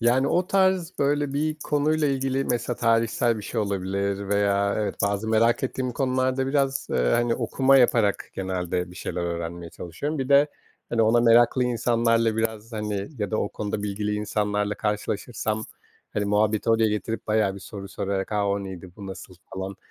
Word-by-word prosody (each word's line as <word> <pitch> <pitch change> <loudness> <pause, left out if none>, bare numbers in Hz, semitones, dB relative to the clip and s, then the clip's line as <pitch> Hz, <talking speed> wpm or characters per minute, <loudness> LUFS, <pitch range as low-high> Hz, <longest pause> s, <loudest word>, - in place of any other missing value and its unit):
Yani, 125 +3 +3
o 180 +1 +1
tarz, 185 -2 +1
böyle, 145 0 +1
bir 155 +2 0
konuyla 150 +1 +1
ilgili, 135 0 0
mesela, 120 0 -1
tarihsel 115 0 +2
bir 105 - -7
şey 110 +2 -2
olabilir 100 0 -2
veya 100 0 +2
evet, 105 -2 -1
bazı 100 +2 0
merak 115 +3 +3
ettiğim 130 -1 -2
konularda 130 0 0
biraz, 135 -1 0
eee, - - 0 0.2
hani, 120 -1 +2
okuma 130 +3 +3
yaparak 115 -5 +3
genelde 90 -1 -2
bir 90 - -13
şeyler 90 - -4
öğrenmeye 85 0 -4
çalışıyorum. 140 - -5
Bir 130 0 -2
de, 140 +1 +6 0.4
hani, 115 -1 +2
ona 115 +2 +4
meraklı 120 +2 +5
insanlarla 115 -2 +2
biraz, 110 0 -2
hani, 105 -2 -3
ya 105 0 -2
da 110 - 0
o 100 - 0
konuda 105 0 -4
bilgili 105 +1 -2
insanlarla 105 0 -1
karşılaşırsam, 105 +1 -2 0.5
hani, 105 - -1
muhabbeti 105 +2 +1
oraya 115 -1 +4
getirip 105 +1 -3
bayağı 105 -3 +2
bir 100 - -9
soru 100 0 -8
sorarak, 95 +1 -3
a, 105 -1 +1
o 100 0 -1
neydi, 95 -1 -8
bu 100 -2 -8
nasıl, 95 -1 -9 0.2
falan, 95 0 -5
110 Hz, 170 wpm, -25 LUFS, 100-125 Hz, 0.5 s, de